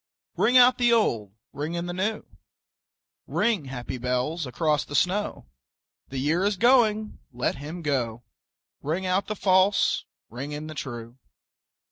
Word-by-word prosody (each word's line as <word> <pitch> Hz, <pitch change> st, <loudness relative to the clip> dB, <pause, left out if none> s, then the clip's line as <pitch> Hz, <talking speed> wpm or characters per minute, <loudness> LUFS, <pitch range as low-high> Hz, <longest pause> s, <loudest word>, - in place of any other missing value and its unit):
Ring 250 Hz, -, +4 dB
out 250 Hz, 0 st, +6 dB
the 240 Hz, -1 st, +4 dB
old, 115 Hz, -, +1 dB, 0.2 s
ring 150 Hz, +4 st, -4 dB
in 170 Hz, 0 st, -3 dB
the 175 Hz, -, -4 dB
new, 210 Hz, +4 st, -2 dB, 1.0 s
Ring, 215 Hz, -10 st, +1 dB
happy 130 Hz, -1 st, -6 dB
bells, 125 Hz, +6 st, -1 dB
across 150 Hz, +3 st, 0 dB
the 145 Hz, -, -7 dB
snow: 200 Hz, +6 st, 0 dB, 0.6 s
The 135 Hz, -, -7 dB
year 155 Hz, +7 st, +1 dB
is 200 Hz, -1 st, +1 dB
going, 220 Hz, -2 st, +3 dB
let 125 Hz, +2 st, -2 dB
him 155 Hz, +5 st, -7 dB
go; 120 Hz, -5 st, -1 dB, 0.6 s
Ring 165 Hz, +6 st, -2 dB
out 185 Hz, +2 st, 0 dB
the 215 Hz, -, -3 dB
false, 190 Hz, +1 st, +3 dB, 0.2 s
ring 135 Hz, +6 st, -6 dB
in 150 Hz, +1 st, -5 dB
the 155 Hz, -, -7 dB
true. 120 Hz, -3 st, -7 dB
160 Hz, 145 wpm, -26 LUFS, 130-205 Hz, 1.0 s, out